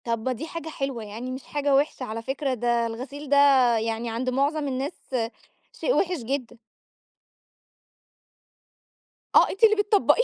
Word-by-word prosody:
طب 230 +1 -1
دي 260 +6 -3
حاجة 325 -1 -6
حلوة، 270 -6 -4
يعني 225 +5 -6
مش 260 +1 -6
حاجة 290 -1 0
وحشة 280 -1 +1
على 230 -2 -4
فكرة، 265 +2 -2
ده 240 -1 +1
الغسيل 270 +5 -7
ده 285 - +4 0.4
يعني 225 +1 -2
عند 235 +3 -2
معظم 285 +3 0
الناس، 270 +4 -2 0.8
شيء - - 0
وحش 360 -1 +1
جدًا. 255 -1 -3 2.8
آه - - +7
أنتِ 390 - -6
اللي 430 -1 +7
بتطبقيه! 415 +3 +3
265 Hz, 140 wpm, -25 LUFS, 235-295 Hz, 2.8 s, آه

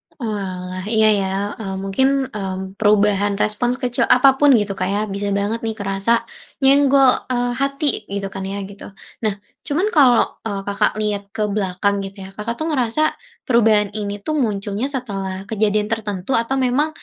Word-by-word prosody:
Oalah, 185 -6 -4
iya 220 -1 +4
ya, 195 - 0 0.3
eee, 195 -3 -4
mungkin, 195 +7 +2 0.2
eee, 195 -3 -4 0.2
perubahan 205 -1 +3
respon 225 +4 0
sekecil 250 -2 -1
apapun 270 +3 +5
gitu 205 -3 +1
Kak 185 -1 -2
ya, 200 +1 0
bisa 200 0 -3
banget 205 +3 -1
nih 225 -1 -3
kerasa, 200 +4 0 0.4
nyenggol, 275 -1 +6 0.2
eee, 245 -1 0
hati 275 -4 -1
gitu 200 0 -3
kan 195 - -5
ya, 195 +1 -4
gitu. 200 +1 -11 0.3
Nah 215 -3 0 0.3
cuman 345 +8 +1
kalau, 255 -6 +6 0.2
eee, 200 -2 -3
Kakak 200 0 +1
lihat 210 -2 -1
ke 215 - 0
belakang 200 -1 -1
gitu 195 0 -8
ya, 190 - -9
Kakak 210 +4 -4
tuh 315 - -3
ngerasa 270 +2 +1 0.3
perubahan 215 -4 +3
ini 205 -1 -4
tuh 310 - -1
munculnya 205 +3 -2
setelah, 195 -6 -4
kejadian 210 0 0
tertentu, 210 -1 -3
atau 230 +3 +1
memang, 275 +5 +1
210 Hz, 160 wpm, -20 LUFS, 200-245 Hz, 0.4 s, nyenggol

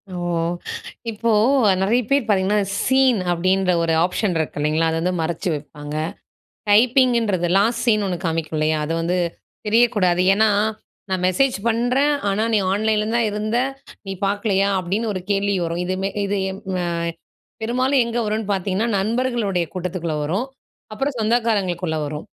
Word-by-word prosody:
ஓ! - - -4 0.9
இப்போ 230 +2 -1 0.5
நெறைய 225 +6 +2
பேர் 275 -3 +2
பாத்தீங்கன்னா, 205 0 +2 0.2
சீன் 265 -3 +3
அப்டின்ற 185 +2 +1
ஒரு 165 - +1
ஆப்ஷன் 180 0 -1
இருக்கு 160 -2 -3
இல்லைங்களா? 155 +2 +1
அத 160 - -1
வந்து 180 +2 0
மறைச்சு 170 +2 -2
வைப்பாங்க. 145 0 -8 0.8
டைப்பிங்குன்றது, 230 -5 +3
லாஸ்ட் 225 +4 +1
சீன் 215 -3 +3
ஒண்ணு 180 -2 -1
காமிக்கும் 160 -1 -2
இல்லையா? 155 0 +1
அது 160 - -3
வந்து 170 +2 0 0.5
தெரியக்கூடாது, 210 -6 +3
ஏன்னா 215 +2 +4 0.6
"நான் 185 -1 -1
மெசேஜ் 250 +9 +2
பண்றேன், 250 +6 +2 0.2
ஆனா 200 +2 0
நீ 215 - +4
ஆன்லைன்ல 215 +1 +1
தான் 235 -1 +2
இருந்த, 215 +3 -1 0.5
நீ 195 - -3
பாக்கலையா?" 200 -1 +1
அப்டின்னு 200 +5 -2
ஒரு 185 - -4
கேள்வி 200 0 +1
வரும். 170 +1 -3
இது 185 - -1
மெ 195 - 0 0.2
இது, 200 +1 -1
எம் 190 +1 -8 0.2
அ - - -1 0.8
பெரும்பாலும் 255 +4 +2
எங்க 235 0 -3
வருன்னு 215 0 -1
பாத்தீங்கன்னா, 195 +4 -1
நண்பர்களுடைய 220 -4 0
கூட்டத்துக்குள்ள 180 -3 -3
வரும், 190 - -1 0.5
அப்பறம் 270 +4 -2
சொந்தக்காரங்களுக்குள்ள 205 -8 0
வரும். 150 +1 -6
200 Hz, 145 wpm, -21 LUFS, 180-230 Hz, 0.9 s, ஏன்னா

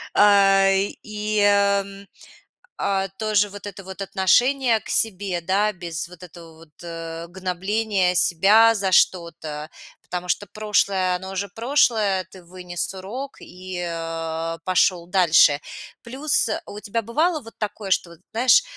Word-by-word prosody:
А, 195 -1 +5
и, 210 +2 -2
эм, 200 -1 +2 0.7
а 195 -1 0
тоже 210 -2 +1
вот 205 +1 -10
это 195 -1 -8
вот 190 +1 -9
отношение 235 +6 +2
к - - -14
себе, 195 -4 -1
да? 195 +5 +1
Без 170 -4 -6
вот 180 -1 -15
этого 170 -2 -13
вот, 165 -1 -17
э, 165 -1 -7
гнобления 190 +1 -1
себя 205 +7 +5
за 195 -3 -1
что-то, 160 -4 0 0.3
потому 180 0 -6
что 205 +3 -1
прошлое 200 -3 0
оно 190 +1 -8
уже 200 +1 -3
прошлое. 225 -7 +1
Ты 185 - -14
вынес 175 0 -5
урок 235 +9 -7
и, 185 0 -8
э, 165 0 -4
пошел 180 -1 +2
дальше. 165 -5 +4 0.4
Плюс, 255 -1 +1
э, 215 - -2
а - - -12
у 205 - -8
тебя 210 +3 -3
бывало 305 - 0
вот 225 -1 -13
такое, 210 -1 -5
что 180 -2 +1
вот 170 -1 -15
знаешь, 250 - +5
195 Hz, 145 wpm, -22 LUFS, 175-210 Hz, 0.7 s, А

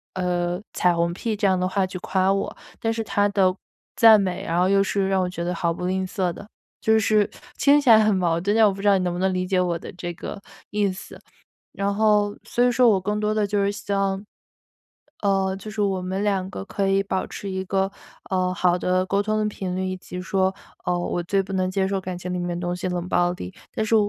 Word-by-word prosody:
呃， 180 0 -1
彩 180 -1 +3
虹 170 0 0
屁 220 +4 -2
这 205 - +2
样 190 -1 +3
的 180 - 0
话 190 0 +1
去 185 - -6
夸 190 +1 +1
我， 195 - -2 0.3
但 225 - +1
是 225 - -2
他 205 -1 +1
的 190 -2 +2 0.4
赞 225 -2 +8
美， 185 -3 -2
然 170 +1 0
后 180 - +3
又 195 +1 +4
是 195 0 0
让 190 -1 +2
我 180 - -1
觉 180 - -6
得 180 +1 -2
毫 170 0 0
不 180 - -5
吝 190 +1 0
啬 185 -2 -1
的。 200 - -10 0.4
就 220 0 +4
是 215 -1 +2 0.3
听 285 +1 +5
起 285 -4 +1
来 225 - +9
很 215 -1 +3
矛 170 -3 +1
盾， 200 +3 +1
但 225 -1 +6
我 200 - +1
不 195 - -8
知 205 - 0
道 200 - +5
你 185 - -1
能 175 - -1
不 175 - -4
能 190 0 +1
理 185 0 -1
解 185 -1 +1
我 175 -2 -1
的 - - -9
这 175 -1 -5
个 200 +4 -7 0.3
意 205 -2 +1
思。 185 - -10 0.6
然 200 0 -1
后 210 -1 +2
所 245 - +1
以 245 - +3
说 245 0 +4
我 195 -3 +3
更 210 +3 -1
多 210 0 0
的 215 -1 +1
就 205 0 0
是 200 - +2
像， 195 -1 -2 1.0
呃， 195 -2 +1
就 205 +3 -8
是 210 0 -2
我 195 -2 0
们 190 +3 -2
两 195 -2 0
个 95 - -6
可 195 - -1
以 195 0 +3
保 190 -1 -2
持 200 - -7
一 190 0 -2
个， 195 +1 0 0.4
嗯， 185 -1 +1
好 180 0 +2
的 185 +1 +1
沟 200 +1 +1
通 215 +1 0
的 215 - +1
频 190 -3 -4
率， 185 0 -1
以 185 - -2
及 180 0 -8
说， 190 0 +1 0.3
嗯， 180 0 +1
我 175 0 -2
最 195 +3 +1
不 195 - -8
能 185 -1 0
接 190 0 0
受 195 0 -1
感 185 -1 -5
情 180 +1 -5
里 180 - -2
面 175 0 -2
的 175 - -2
东 175 0 -1
西 180 +1 -3
冷 180 -1 -3
暴 175 -1 +2
力。 90 - -8 0.2
但 220 - -1
是， 220 - +1
190 Hz, 275 characters per minute, -23 LUFS, 180-205 Hz, 1.0 s, 来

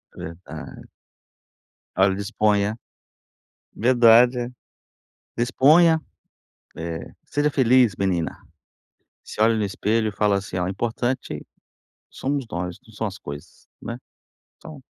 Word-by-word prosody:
Verdade. 85 +3 -9 1.1
Olha, 95 0 +4
disponha. 105 +1 0 1.0
Verdade. 120 +1 +5 0.9
Disponha! 155 +7 +5 0.8
Eh, 85 0 -5 0.2
seja 145 +1 0
feliz, 125 -5 +4
menina! 90 -4 -1 0.9
Se - - -8
olha 115 +1 +5
no 105 - 0
espelho, 105 +2 0
fala 105 -1 +2
assim: 95 -1 -5
"Ó, 90 - 0
o 90 - -2
importante 120 +5 -3 0.7
somos 135 -2 -3
nós, 90 0 -4
não 110 - -17
são 110 - -2
as 95 0 -6
coisas, 75 +3 -10
né. 115 +1 -5 0.6
Então" 155 -4 -12
110 Hz, 105 wpm, -23 LUFS, 95-125 Hz, 1.1 s, Verdade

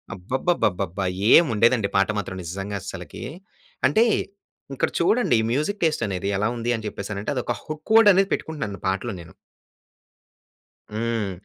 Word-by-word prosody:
అబ్బబ్బబ్బబ్బబ్బా! 95 - -1 0.3
ఏముంఉండేదండి 115 -7 +5
పాట 100 +1 +3
మాత్రం 95 -2 -4
నిజంగా 95 +4 -5
అస్సలకీ. 90 -3 -8 0.6
అంటే, 220 - +4 0.7
ఇక్కడ - - 0
చూడండి, 215 - +3
ఈ - - -2
మ్యూజిక్ 155 - -1
టేస్టనేది 100 - 0
ఎలా 105 - +1
ఉంది 120 +1 -1
అని 110 -1 -6
చెప్పేసనంటే, 100 +5 -4
అదొక 120 -1 -2
హుక్ 155 +6 -7
వర్డనేది 200 -3 +6
పెట్టుకుంటున్నాను 105 - -4
పాటలో 95 +2 -1
నేను. 80 -1 -12 1.6
హ్మ్. 115 -3 -1
110 Hz, 120 wpm, -23 LUFS, 100-155 Hz, 1.6 s, వర్డనేది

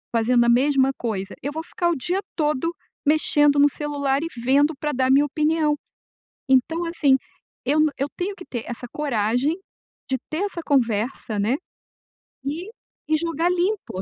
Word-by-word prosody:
fazendo 240 +1 +3
a - - +3
mesma 270 +2 +4
coisa. 205 -4 -3
Eu 285 - -3
vou 320 +2 -4
ficar 345 +1 -1
o 340 - +1
dia 350 +7 -1 0.2
todo 305 +1 0 0.3
mexendo 295 -1 +4
no 290 +1 +6
celular 285 -1 -1
e - - -1 0.2
vendo 285 +5 +4
pra 300 - -1
dar 260 -1 +1
minha 280 +2 +5
opinião, 305 +1 +1 0.7
então, 270 +6 +2
assim, 305 -5 +3 0.5
eu 290 +4 +2 0.2
eu 275 - 0
tenho 385 +3 -2
que 360 - -11
ter 240 -3 -5
essa 240 +1 -6
coragem 250 +1 0 0.5
de 265 - +1
ter 320 +5 -1
essa 365 -4 -5
conversa, 230 -4 0
né, 215 +6 +2 0.9
e 315 +8 -4 0.4
e 310 - +4
jogar 330 +1 0
limpo, 360 - -1
290 Hz, 160 wpm, -23 LUFS, 255-320 Hz, 0.9 s, no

